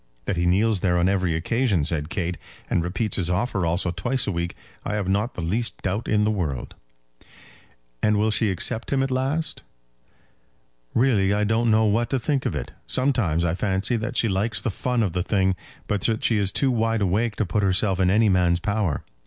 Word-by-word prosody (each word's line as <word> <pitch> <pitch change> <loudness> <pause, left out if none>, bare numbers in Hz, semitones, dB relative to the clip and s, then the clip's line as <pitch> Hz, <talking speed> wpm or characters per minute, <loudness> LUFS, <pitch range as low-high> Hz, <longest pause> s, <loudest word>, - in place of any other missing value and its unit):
"That 100 - -1
he 85 0 0
kneels 100 +3 +3
there 90 -1 +1
on 85 +1 +3
every 95 -4 +1
occasion," 100 - +1
said 75 -1 -2
Kate, 90 -1 -2 0.4
"and 85 - +2
repeats 95 +5 -1
his 90 -3 +1
offer 95 -1 0
also 85 +1 0
twice 125 +8 0
a - - -1
week, 85 -1 -3 0.3
I 105 - -2
have 100 -3 -2
not 100 +5 0
the 90 - -4
least 110 +8 -2
doubt 100 +4 -2
in 105 -1 +2
the 105 - +2
world." 80 - -3 1.3
"And 105 0 +3
will 110 +1 +2
she 110 0 +1
accept 100 +5 -1
him 135 -1 +2
at 135 - -2
last?" 135 +5 -1 1.3
"Really 105 -6 +3
I 105 - +1
don't 110 +2 +1
know 110 0 +4
what 115 +3 +1
to 135 - +1
think 135 +2 -1
of - - -3
it. - - -4 0.2
Sometimes 120 - +1
I 80 - +1
fancy 95 +5 0
that 115 +1 -3
she 115 - +3
likes 105 +3 0
the 115 - -2
fun 125 +4 0
of 95 -5 -1
the 90 - 0
thing, 95 -1 +1 0.3
but 105 -2 -1
that 110 +1 0
she 110 -3 +2
is 100 -1 0
too 135 +5 +1
wide 115 -2 0
awake 105 +4 +1
to 110 - 0
put 105 +3 0
herself 95 0 +1
in 90 -1 +3
any 110 +3 +4
man's 90 -3 +3
power. 100 -6 -1
105 Hz, 210 wpm, -24 LUFS, 90-115 Hz, 1.3 s, know